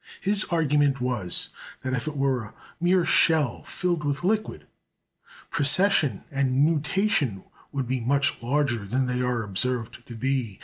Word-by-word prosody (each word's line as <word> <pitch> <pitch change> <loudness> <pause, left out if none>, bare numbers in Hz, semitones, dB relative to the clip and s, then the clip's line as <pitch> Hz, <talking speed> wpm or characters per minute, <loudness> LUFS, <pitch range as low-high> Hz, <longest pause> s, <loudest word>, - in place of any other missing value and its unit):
His 200 +1 +1
argument 145 -4 +1
was, 120 -8 -1 0.3
that 130 - -3
if 125 +1 -2
it 150 -1 -4
were 135 -2 +1
a 105 - -12 0.3
mere 175 0 +2
shell 155 -7 +3
filled 175 -4 -2
with 145 +2 -2
liquid, 215 +3 -1 0.9
precession 145 - +3
and 135 0 +2
nutation 155 - 0 0.3
would 135 -3 -3
be 130 +1 -1
much 140 +3 0
larger 120 -2 0
than 130 +5 0
they 125 0 -1
are 125 -2 -1
observed 120 +4 -2
to 120 - -9
be. 125 -4 -2
135 Hz, 145 wpm, -25 LUFS, 125-155 Hz, 0.9 s, shell